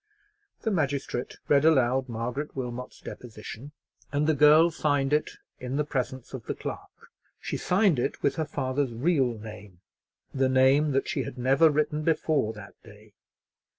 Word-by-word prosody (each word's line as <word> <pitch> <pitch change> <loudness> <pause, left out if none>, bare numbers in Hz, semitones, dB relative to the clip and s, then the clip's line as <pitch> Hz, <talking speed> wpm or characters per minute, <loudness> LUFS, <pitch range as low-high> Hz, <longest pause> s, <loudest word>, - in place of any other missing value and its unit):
The 220 - -1
magistrate 140 -7 -2
read 140 -1 +4
aloud 130 -4 +3
Margaret 120 +6 -4
Wilmot's 125 -1 -6
deposition, 115 +3 -9 0.4
and 145 +1 +1
the 160 - +3
girl 150 +3 +6
signed 145 -3 0
it 150 - 0 0.2
in 125 +1 -4
the 150 - +1
presence 130 -3 -4
of 130 -4 -7
the - - -2
clerk; - - -8 0.3
she - - -4
signed 180 - +2
it 130 - -2
with - - +1
her 160 - 0
father's 135 -3 -2
real 130 -2 +1
name, 105 -4 -11 0.5
the 130 -1 +1
name 135 +3 +4
that 135 - 0
she - - -1
had - - -6
never 135 +6 +4
written 150 0 0
before 155 -6 +1
that 105 -2 -11
day. 105 -1 -17
135 Hz, 155 wpm, -27 LUFS, 120-150 Hz, 0.5 s, girl